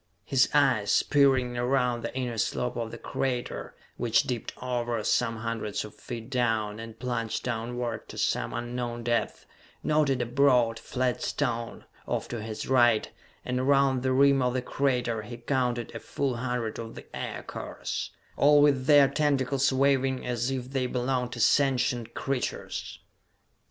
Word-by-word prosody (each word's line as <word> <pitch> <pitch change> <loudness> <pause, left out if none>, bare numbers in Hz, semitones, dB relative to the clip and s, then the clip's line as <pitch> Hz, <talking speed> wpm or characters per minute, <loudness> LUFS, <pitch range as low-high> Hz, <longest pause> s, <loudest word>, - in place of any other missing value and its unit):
His 135 -1 +3
eyes, 130 -9 +3
peering 130 -4 +3
around 125 -1 +1
the 115 - -5
inner 120 -3 -2
slope 125 +2 -1
of 115 -1 -3
the - - -8
crater 125 -2 -3 0.2
which 115 -1 +3
dipped 120 -3 -3
over, 120 -3 -2
some 115 +1 +1
hundreds 110 -2 -3
of 105 - -11
feet 120 0 -8
down, 115 -4 0
and 115 0 -8
plunged 120 -3 -2
downward 120 0 -3
to - - -9
some - - 0
unknown 120 0 -4
depth 120 0 -1 0.4
noted 150 -4 +2
a 120 - 0
broad, 120 -3 +3
flat 125 -1 -1
stone, 120 -4 -2 0.2
off - - -2
to 120 -2 -4
his 110 0 -5
right; 120 -4 +4 0.3
and 125 0 -1
around 135 -1 +3
the 130 0 0
rim 140 +1 +5
of 125 0 +1
the 130 - -1
crater 125 -5 0
he 120 +3 -8
counted 120 -2 -1
a 115 - -5
full 135 -1 -2
hundred 120 -2 -2
of 115 -1 -7
the - - -10
aircars, - - -5 0.3
all 145 +1 +6
with 140 -3 +3
their 145 -2 +7
tentacles 140 -2 +1
waving 135 -1 +2
as 120 0 -1
if 130 -1 -4
they 130 -2 0
belonged 125 0 -1
to 120 - -6
sentient 125 -2 +2
creatures. 135 -2 -3
125 Hz, 155 wpm, -28 LUFS, 115-135 Hz, 0.4 s, their